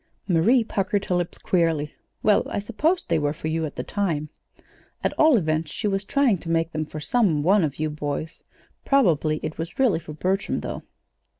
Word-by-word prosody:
_" -, -, -44 dB, 0.3 s
Marie 225 Hz, +10 st, +4 dB
puckered 200 Hz, -1 st, -1 dB
her -, -, -1 dB
lips 175 Hz, -1 st, -1 dB
queerly. 165 Hz, -4 st, 0 dB, 0.3 s
"Well, 210 Hz, -2 st, +4 dB
I -, -, -3 dB
supposed 285 Hz, -, 0 dB
they -, -, +2 dB
were 145 Hz, -1 st, 0 dB
for 155 Hz, 0 st, -5 dB
you 160 Hz, 0 st, -1 dB
at -, -, -11 dB
the -, -, -3 dB
time. 165 Hz, -7 st, -2 dB, 0.7 s
At -, -, +1 dB
all 310 Hz, -5 st, +5 dB
events 155 Hz, -3 st, 0 dB
she 215 Hz, -, -2 dB
was 195 Hz, -1 st, 0 dB
trying 245 Hz, -3 st, +2 dB
to 165 Hz, -, -8 dB
make 165 Hz, 0 st, +1 dB
them 155 Hz, -1 st, -3 dB
for 155 Hz, -, -7 dB
some 170 Hz, -5 st, +1 dB
one 190 Hz, +3 st, +4 dB
of 145 Hz, -3 st, -1 dB
you 155 Hz, 0 st, -1 dB
boys; 150 Hz, +2 st, -4 dB, 0.4 s
probably 160 Hz, -, +2 dB
it 155 Hz, -, -5 dB
was 165 Hz, +1 st, -5 dB
really 250 Hz, -10 st, +3 dB
for 155 Hz, -2 st, -9 dB
Bertram, 190 Hz, +5 st, -1 dB
though." -, -, -5 dB
170 Hz, 200 wpm, -24 LUFS, 155-205 Hz, 0.7 s, all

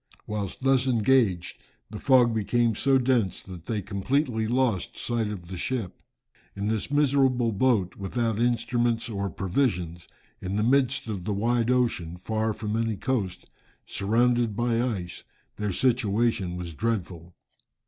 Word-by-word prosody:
Whilst 105 Hz, +2 st, -4 dB
thus 135 Hz, -1 st, +3 dB
engaged, 115 Hz, -7 st, +2 dB, 0.3 s
the 105 Hz, -, -6 dB
fog 125 Hz, -4 st, +4 dB
became 115 Hz, +2 st, +1 dB
so 135 Hz, +5 st, +3 dB
dense, 120 Hz, -8 st, +1 dB
that 90 Hz, -3 st, -11 dB
they 105 Hz, -4 st, -2 dB
completely 110 Hz, -, 0 dB
lost 120 Hz, -5 st, 0 dB
sight 115 Hz, -2 st, -1 dB
of 95 Hz, -5 st, -6 dB
the 95 Hz, +1 st, -6 dB
ship. 105 Hz, -3 st, -3 dB, 0.5 s
In 100 Hz, -, -3 dB
this 110 Hz, +1 st, -1 dB
miserable 135 Hz, -4 st, +2 dB
boat, 105 Hz, -4 st, +1 dB
without 110 Hz, +2 st, -1 dB
instruments 120 Hz, -1 st, +1 dB
or 100 Hz, -2 st, -2 dB
provisions, 90 Hz, -3 st, -1 dB, 0.3 s
in 95 Hz, +1 st, -3 dB
the 105 Hz, -, +1 dB
midst 130 Hz, +1 st, +2 dB
of 100 Hz, -5 st, -4 dB
the 105 Hz, -, -1 dB
wide 115 Hz, +3 st, +1 dB
ocean, 115 Hz, -10 st, 0 dB
far 110 Hz, +4 st, -1 dB
from 105 Hz, 0 st, -3 dB
any 115 Hz, -1 st, 0 dB
coast, 100 Hz, -5 st, -2 dB, 0.4 s
surrounded 115 Hz, +2 st, +1 dB
by 120 Hz, 0 st, +1 dB
ice, 100 Hz, -8 st, -3 dB, 0.3 s
their 105 Hz, -1 st, -1 dB
situation 110 Hz, -5 st, +1 dB
was 85 Hz, -2 st, -6 dB
dreadful. 90 Hz, -4 st, -3 dB
110 Hz, 140 wpm, -26 LUFS, 100-125 Hz, 0.5 s, fog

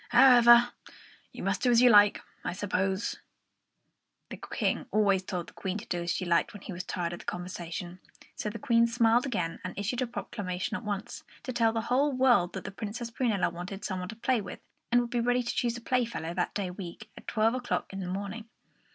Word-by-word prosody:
However, 240 Hz, -1 st, +7 dB, 0.6 s
you -, -, -8 dB
must -, -, 0 dB
do 250 Hz, -, +3 dB
as 235 Hz, -1 st, +5 dB
you 250 Hz, 0 st, +7 dB
like, 205 Hz, -1 st, +6 dB, 0.2 s
I -, -, -2 dB
suppose." 190 Hz, +1 st, -1 dB, 1.1 s
The -, -, -6 dB
King -, -, -2 dB
always 200 Hz, -3 st, +3 dB
told 180 Hz, -2 st, -4 dB
the -, -, -19 dB
Queen 190 Hz, 0 st, -3 dB
to 205 Hz, -, -8 dB
do 175 Hz, -1 st, -2 dB
as 170 Hz, -, -4 dB
she 175 Hz, +2 st, -1 dB
liked 170 Hz, 0 st, +2 dB
when 205 Hz, -, -11 dB
he 195 Hz, -, -6 dB
was 180 Hz, +1 st, -5 dB
tired 175 Hz, -2 st, -3 dB
of 175 Hz, -, -7 dB
the -, -, -13 dB
conversation; 175 Hz, 0 st, -5 dB, 0.4 s
so 210 Hz, -, -3 dB
the 220 Hz, -, -6 dB
Queen 235 Hz, -3 st, +3 dB
smiled 235 Hz, +2 st, +3 dB
again 175 Hz, -9 st, -2 dB
and 185 Hz, -, -6 dB
issued 205 Hz, +5 st, -2 dB
a 255 Hz, -, 0 dB
proclamation 205 Hz, -3 st, -4 dB
at -, -, -5 dB
once, 210 Hz, +2 st, -4 dB, 0.2 s
to 255 Hz, -, -4 dB
tell 230 Hz, -1 st, +3 dB
the 225 Hz, 0 st, -1 dB
whole 265 Hz, +6 st, +2 dB
world 250 Hz, -9 st, +3 dB
that -, -, -5 dB
the -, -, -6 dB
Princess 225 Hz, +3 st, -5 dB
Prunella 225 Hz, -8 st, 0 dB
wanted 180 Hz, +3 st, -6 dB
some 185 Hz, -2 st, -2 dB
one 180 Hz, 0 st, -5 dB
to 225 Hz, -, -7 dB
play 235 Hz, +1 st, +1 dB
with, -, -, -8 dB, 0.3 s
and 245 Hz, 0 st, +5 dB
would 240 Hz, -1 st, -5 dB
be 240 Hz, -, 0 dB
ready 245 Hz, +1 st, +2 dB
to 240 Hz, -, -3 dB
choose 240 Hz, -1 st, 0 dB
a -, -, -9 dB
playfellow 235 Hz, -10 st, -1 dB
that 175 Hz, 0 st, -2 dB
day 195 Hz, -3 st, -2 dB
week, 190 Hz, +3 st, -9 dB
at -, -, -13 dB
twelve 225 Hz, 0 st, +2 dB
o'clock 250 Hz, -5 st, -2 dB
in 195 Hz, -, -5 dB
the 185 Hz, -, -4 dB
morning. 200 Hz, +4 st, -5 dB
210 Hz, 220 wpm, -29 LUFS, 185-240 Hz, 1.1 s, However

